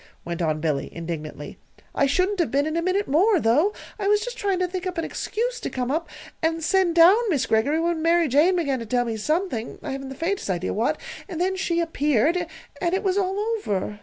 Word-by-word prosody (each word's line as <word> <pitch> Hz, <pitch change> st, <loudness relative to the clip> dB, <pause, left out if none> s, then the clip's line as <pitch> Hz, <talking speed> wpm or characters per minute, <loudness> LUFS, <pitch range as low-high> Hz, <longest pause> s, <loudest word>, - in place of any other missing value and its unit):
went 170 Hz, +1 st, -4 dB
on 155 Hz, -2 st, 0 dB
Billy, 150 Hz, -3 st, -1 dB
indignantly. 160 Hz, -3 st, -6 dB, 0.3 s
"I 280 Hz, -, +2 dB
shouldn't 370 Hz, +7 st, +1 dB
have 340 Hz, -, +2 dB
been, 280 Hz, +2 st, +1 dB
in 315 Hz, +1 st, -2 dB
a 335 Hz, -, +1 dB
minute 370 Hz, +4 st, 0 dB
more, 365 Hz, +8 st, +4 dB
though. 290 Hz, -, +3 dB, 0.3 s
I 395 Hz, -, -1 dB
was 415 Hz, 0 st, +4 dB
just -, -, -5 dB
trying 395 Hz, -5 st, 0 dB
to 365 Hz, 0 st, 0 dB
think 370 Hz, +1 st, -4 dB
up 365 Hz, -1 st, -4 dB
an 330 Hz, -, -1 dB
excuse -, -, -3 dB
to -, -, -4 dB
come 255 Hz, 0 st, -2 dB
up 325 Hz, +3 st, -2 dB, 0.3 s
and 325 Hz, 0 st, 0 dB
send 370 Hz, -1 st, +2 dB
down 345 Hz, +4 st, +8 dB
Miss 285 Hz, -8 st, +1 dB
Greggory, 260 Hz, +8 st, +2 dB
when 335 Hz, -1 st, 0 dB
Mary 335 Hz, 0 st, +3 dB
Jane 300 Hz, +8 st, +4 dB
began 280 Hz, -7 st, 0 dB
to 230 Hz, -, -7 dB
tell 245 Hz, +2 st, +1 dB
me 230 Hz, -1 st, -2 dB
something 280 Hz, -, -2 dB
I -, -, -4 dB
haven't 270 Hz, 0 st, -5 dB
the 270 Hz, -, -7 dB
faintest 355 Hz, -, -2 dB
idea 185 Hz, -1 st, -1 dB
what 240 Hz, +9 st, 0 dB, 0.3 s
then 365 Hz, +2 st, -1 dB
she 345 Hz, -2 st, 0 dB
appeared, 320 Hz, +1 st, +1 dB, 0.3 s
and 350 Hz, 0 st, +1 dB
it 390 Hz, -, -2 dB
was 380 Hz, -2 st, +1 dB
all 380 Hz, 0 st, -1 dB
over. 405 Hz, -, -2 dB
330 Hz, 220 wpm, -24 LUFS, 250-370 Hz, 0.3 s, down